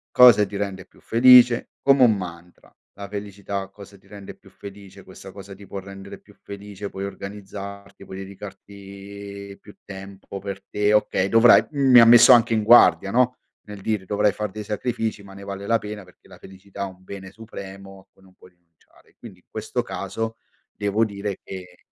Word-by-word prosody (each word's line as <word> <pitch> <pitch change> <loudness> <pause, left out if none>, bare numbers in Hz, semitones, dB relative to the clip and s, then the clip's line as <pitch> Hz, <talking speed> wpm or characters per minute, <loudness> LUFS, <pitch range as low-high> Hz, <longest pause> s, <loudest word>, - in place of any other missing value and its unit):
Cosa 125 -4 +7
ti 100 +1 -10
rende 100 -2 -5
più - - -25
felice? 120 0 +5
Come 135 -1 +4
un 115 -3 +5
mantra, 90 -1 -11 0.2
la 100 0 -9
felicità, 100 -1 -6
cosa 100 0 -15
ti 95 - -26
rende 100 -1 -11
più - - -21
felice, 100 -1 -13
questa 95 +1 -13
cosa 100 0 -11
ti 100 0 -15
può 100 - -6
rendere 100 0 -11
più - - -21
felice, 100 0 -9
puoi 95 +1 -6
organizzarti, 100 0 -9
puoi 95 -1 -10
dedicarti 100 0 -11
più 105 - -16
tempo 100 0 -10
per 100 0 -7
te, 105 0 +1
okay, 105 -2 +1
dovrai, 115 +2 +6
mi 135 -4 +5
ha 115 - +8
messo 120 +2 +8
anche 120 -1 +4
in 110 - 0
guardia 100 -5 +5
no, 125 +2 +1 0.3
nel 105 -1 -10
dire: 105 -1 -2
"Dovrai 105 +1 +1
far 105 0 -4
dei 105 +3 -8
sacrifici 110 0 -3
ma 100 0 -14
ne 100 - -11
vale 100 0 -7
la 115 - +3
pena 105 -1 -8
perché 90 -1 -22
la - - -16
felicità 95 +1 -12
è - - -1
un 95 0 -18
bene 95 0 -10
supremo 95 -3 -11
a 95 - -22
cui 95 - -27
non 95 -1 -21
puoi 90 - -20
rinunciare", 85 -2 -30
quindi 100 -6 -13
in - - -34
questo 110 +3 -4
caso 115 +1 -5 0.4
devo 105 +2 0
dire 100 -2 -6
che 90 -2 -10
100 Hz, 190 wpm, -22 LUFS, 95-105 Hz, 0.4 s, ha